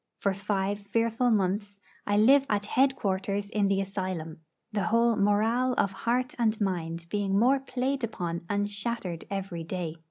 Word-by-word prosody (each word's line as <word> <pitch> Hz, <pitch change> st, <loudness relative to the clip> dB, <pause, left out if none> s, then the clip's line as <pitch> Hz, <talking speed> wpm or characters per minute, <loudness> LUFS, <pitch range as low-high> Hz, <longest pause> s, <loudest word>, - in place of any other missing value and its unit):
For 200 Hz, -, 0 dB
five 200 Hz, 0 st, -1 dB
fearful 230 Hz, +4 st, +1 dB
months 205 Hz, -1 st, 0 dB, 0.3 s
I 205 Hz, 0 st, +2 dB
lived 270 Hz, +6 st, +5 dB
at 205 Hz, -1 st, +1 dB
head 265 Hz, +5 st, +3 dB
quarters 200 Hz, 0 st, -2 dB
in 210 Hz, -3 st, +2 dB
the 195 Hz, 0 st, +2 dB
asylum, 185 Hz, -5 st, -4 dB, 0.3 s
the 205 Hz, -3 st, -1 dB
whole 230 Hz, +1 st, +3 dB
morale 220 Hz, +5 st, +2 dB
of 200 Hz, -, +2 dB
heart 245 Hz, +5 st, -1 dB
and 220 Hz, -2 st, +2 dB
mind 170 Hz, -4 st, -2 dB
being 200 Hz, -2 st, 0 dB
more 255 Hz, +6 st, +4 dB
played 265 Hz, 0 st, -2 dB
upon 175 Hz, -7 st, -3 dB
and 205 Hz, 0 st, +1 dB
shattered 205 Hz, -4 st, -4 dB
every 195 Hz, -4 st, -4 dB
day. 165 Hz, -2 st, -4 dB
205 Hz, 160 wpm, -28 LUFS, 195-230 Hz, 0.3 s, lived